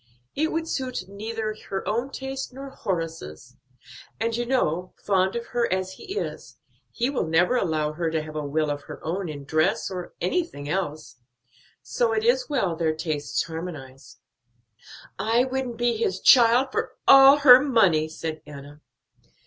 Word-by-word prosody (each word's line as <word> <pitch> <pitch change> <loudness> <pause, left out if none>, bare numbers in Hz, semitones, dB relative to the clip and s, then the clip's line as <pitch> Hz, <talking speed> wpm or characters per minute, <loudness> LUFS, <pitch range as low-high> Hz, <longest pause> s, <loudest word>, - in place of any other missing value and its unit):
It 315 +2 0
would 325 0 -2
suit 255 - -3
neither 215 +2 -4
her 195 - -4
own 235 +5 -1
taste 265 0 -6
nor 270 +1 -9
Horace's; 165 - -5 0.6
and 230 +1 -1
you 240 0 -2
know, 180 -9 -1
fond 190 0 +1
of 235 0 -3
her 240 -4 0
as 185 0 -1
he 390 - -8
is, - - -6 0.3
he 245 +3 -1
will 250 - -1
never 175 +8 +2
allow 155 -9 0
her 165 +1 -2
to 160 -1 -2
have 155 0 -10
a 150 - -3
will 150 +1 -1
of 145 0 -4
her - - -9
own 175 +2 -3
in 145 -2 -7
dress 155 +7 0
or 180 -2 -7
anything 180 - -2
else. 155 -6 -4 0.7
So 225 - 0
it 220 -1 0
is 250 +4 +2
well 195 - 0
their 160 -1 0
tastes 155 -2 -2
harmonize." 155 -5 -8 1.0
"I 225 +5 +2
wouldn't 260 -2 -3
be 240 0 +1
his 190 -4 -1
child 245 +3 +6
for - - -3
all 275 +1 +9
her 255 -3 +9
money," 200 - +2
said 160 0 -6
Enna. 145 0 -11
190 Hz, 165 wpm, -25 LUFS, 155-245 Hz, 1.0 s, all